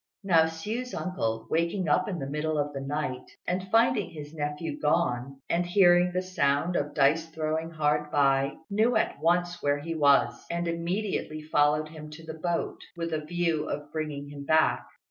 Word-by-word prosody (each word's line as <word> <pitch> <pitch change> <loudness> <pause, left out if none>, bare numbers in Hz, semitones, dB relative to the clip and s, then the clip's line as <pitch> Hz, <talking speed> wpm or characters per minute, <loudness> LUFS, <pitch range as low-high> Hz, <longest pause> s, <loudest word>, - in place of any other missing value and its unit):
Now 165 -5 +5
Hsiu's 215 +10 -4
uncle, 115 -12 -2
waking 170 +3 0
up 185 +6 +2
in 185 - -3
the 140 - -4
middle 150 +2 -2
of 145 0 -1
the 135 - -4
night, 135 -2 -3 0.2
and 185 +1 -2
finding 225 -2 +3
his 150 -2 -9
nephew 150 - -4
gone, 135 - 0
and 170 +1 +1
hearing 175 -1 +5
the 185 +1 -1
sound 165 -2 +1
of 145 -2 -1
dice 155 +3 +3
throwing 160 0 -2
hard 150 -2 0
by, 140 -1 +2
knew 220 +4 +2
at 220 - 0
once 175 +1 +1
where 145 0 +2
he 165 +3 -4
was, 145 -3 +3
and 170 0 -2
immediately 170 -2 -2
followed 150 0 +2
him 155 -1 -10
to 160 +1 -11
the 160 - -6
boat 170 0 -2 0.2
with 165 -1 -3
a 155 -1 -1
view 165 -1 -1
of 145 0 -5
bringing 150 -3 -4
him 145 -1 -8
back. 155 +2 +2
160 Hz, 180 wpm, -28 LUFS, 145-175 Hz, 0.2 s, Now